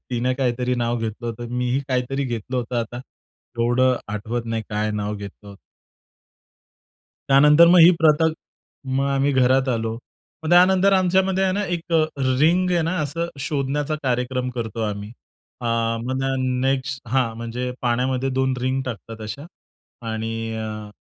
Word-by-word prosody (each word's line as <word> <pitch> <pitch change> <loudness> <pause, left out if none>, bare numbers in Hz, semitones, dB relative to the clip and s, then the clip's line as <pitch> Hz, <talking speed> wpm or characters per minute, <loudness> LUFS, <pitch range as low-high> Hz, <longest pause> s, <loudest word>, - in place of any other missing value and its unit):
तिने 125 +1 0
काहीतरी 125 -1 0
नाव 120 -1 -1
घेतलं 115 +1 -4
होतं. 120 +1 -5
मीही 125 +2 0
काहीतरी 130 +2 -1
घेतलं 120 0 -4
होतं. 125 0 -2
आता 120 +2 -6 0.6
एवढं 125 +2 +3 0.2
आठवत 115 +3 -3
नाही 115 -1 -2
काय 105 0 -1
नाव 105 0 -3
घेतलं 100 0 -10
होतं. 100 - -11 1.7
त्यानंतर 150 +4 +7
मग 180 +1 +6
ही 165 +2 +9
प्रथा, 155 0 +4 0.7
मग 135 - +1
आम्ही 140 +1 +1
घरात 130 0 +3
आलो. 115 -2 -1 0.5
मग 160 - -2
त्यानंतर 185 +2 +5
आमच्यामध्ये 190 0 +2
आहे 190 - +1
ना, 205 +2 -1
1 170 -2 -4 0.5
रिंग 180 +4 +3
आहे 175 -2 +2
ना, 165 +3 -1
असं 165 +4 -3 0.2
शोधण्याचा 145 +1 -1
कार्यक्रम 125 0 -1
करतो 115 -2 -4
आम्ही. 100 +1 -7 0.5
आ, 120 - -4 0.3
मग 130 +3 -3
त्या 135 - 0
न 130 -1 -1
नेक्स्ट. 135 0 -1
हां 125 -2 +1
म्हणजे 115 +2 -4
पाण्यामध्ये 125 +2 0
2 130 0 +1
रिंग 130 +1 0
टाकतात 115 -2 -7
अशा. 110 +8 -7 0.6
आणि 110 0 -3 0.3
अ, 110 -1 -6
125 Hz, 150 wpm, -22 LUFS, 115-145 Hz, 1.7 s, ही